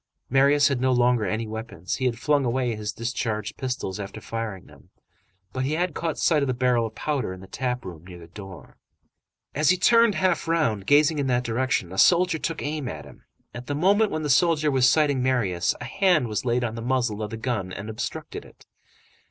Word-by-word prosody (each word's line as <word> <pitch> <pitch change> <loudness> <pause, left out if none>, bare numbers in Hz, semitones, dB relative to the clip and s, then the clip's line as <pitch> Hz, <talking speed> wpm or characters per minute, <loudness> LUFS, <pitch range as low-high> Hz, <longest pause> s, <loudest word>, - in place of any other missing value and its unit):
Marius 140 +2 +4
had 135 -3 -1
no 130 0 +2
longer 125 -2 +2
any 110 +4 -2
weapons; 110 -5 -5
he 130 - -2
had 120 -2 0
flung 145 +2 +1
away 125 -1 0
his 105 0 -4
discharged 115 -3 -3
pistols 125 -7 -4
after 105 +1 -7
firing 110 -4 -5
them; - - -19 0.6
but 130 - -2
he 140 +3 -1
had 175 +1 -1
caught 165 0 -3
sight 155 -3 +2
of 140 - 0
the 130 - -1
barrel 120 -2 +2
of 110 - -13
powder 140 -10 -2
in 95 - -10
the 95 - -11
tap 125 +2 -3
room, 85 -4 -9
near 90 -1 -10
the 85 - -12
door. 95 +2 -12 0.8
As 150 +1 +2
he 185 - +4
turned 230 +2 +4
half 180 -3 0
round, 115 -13 0
gazing 150 +1 +4
in 140 - 0
that 125 -1 +1
direction, 120 -6 -1
a 95 - -3
soldier 180 -2 +4
took 165 +1 -3
aim 150 -2 -3
at - - -6
him. - - -16 0.3
At 125 +1 -8
the 145 - -2
moment 200 +7 +3
when 155 -3 -3
the 150 - -2
soldier 155 +1 +3
was 130 -2 +4
sighting 145 -2 +2
Marius, 100 -10 0
a - - -6
hand 185 -9 +2
was 105 +2 -3
laid 120 0 +1
on 115 -2 -2
the 115 - -6
muzzle 120 -3 -1
of 105 - -3
the 115 - -6
gun 110 -6 -3
and 100 +3 -7
obstructed 110 -1 -5
it. - - -19
125 Hz, 220 wpm, -25 LUFS, 110-150 Hz, 0.8 s, Marius